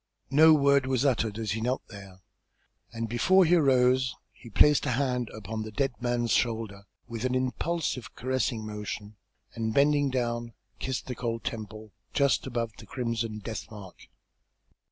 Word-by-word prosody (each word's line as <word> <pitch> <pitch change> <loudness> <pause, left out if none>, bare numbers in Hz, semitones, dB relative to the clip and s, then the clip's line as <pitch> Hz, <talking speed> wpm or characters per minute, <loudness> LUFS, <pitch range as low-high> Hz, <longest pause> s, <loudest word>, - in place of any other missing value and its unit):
No 155 +3 +7
word 140 -2 +3
was 130 0 +1
uttered 110 -5 +1
as 110 -3 -2
he 110 +2 -2
knelt 125 +3 -1
there, 100 -3 -12 0.7
and 115 0 -4
before 185 - +4
he 170 - +3
arose 130 -5 +3 0.2
he 120 - -14
placed 150 +6 +4
a 130 - +1
hand 125 -2 0
upon 110 +1 -6
the 110 - -5
dead 135 +4 -1
man's 120 -2 0
shoulder 110 -4 -1 0.2
with 115 -2 -5
an 130 0 0
impulsive 130 0 -2
caressing 130 -3 -1
motion, 105 0 -6 0.4
and 110 -1 -3
bending 145 0 +4
down, 120 -2 -2 0.3
kissed 130 -1 -3
the 125 - -4
cold 115 -2 -3
temple 110 -1 -6 0.2
just 140 -2 +2
above 120 -3 -2
the 110 - -12
crimson 115 -3 -3
death 110 +1 -6
mark. 100 -4 -12
120 Hz, 155 wpm, -28 LUFS, 110-130 Hz, 0.7 s, No